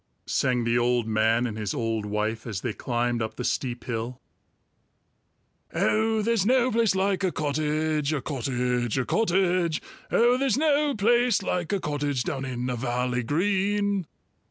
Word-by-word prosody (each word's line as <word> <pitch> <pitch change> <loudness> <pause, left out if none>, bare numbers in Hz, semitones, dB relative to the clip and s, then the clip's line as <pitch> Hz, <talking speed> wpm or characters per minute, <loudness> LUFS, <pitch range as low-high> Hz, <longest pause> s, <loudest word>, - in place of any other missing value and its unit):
sang 125 -2 +1
the 115 +1 +2
old 120 -1 +1
man 110 +2 +2
and 110 -2 -4
his 105 -3 -2
old 115 -2 -2
wife 110 +2 -2
as 100 -4 -4
they 120 - -2
climbed 120 0 -1
up 110 - -3
the 125 - -5
steep 120 -1 -2
hill. 120 +1 -4 1.6
"Oh, 220 0 +2
there's 230 -2 +2
no 255 +3 +3
place 225 -3 +2
like 195 0 +1
a 185 - +2
cottage, 155 0 0
A 155 - 0
cottage, 125 -3 -1
a 130 - 0
cottage! 180 - +1 0.3
Oh, 240 +2 +4
there's 265 -4 +2
no 295 -1 +2
place 235 0 +3
like 175 -3 -2
a 200 - +1
cottage 145 -5 -1
Down 135 0 -3
in 125 -1 -3
a 125 - -1
valley 125 +1 -1
green!" 200 - 0
145 Hz, 155 wpm, -26 LUFS, 120-200 Hz, 1.6 s, Oh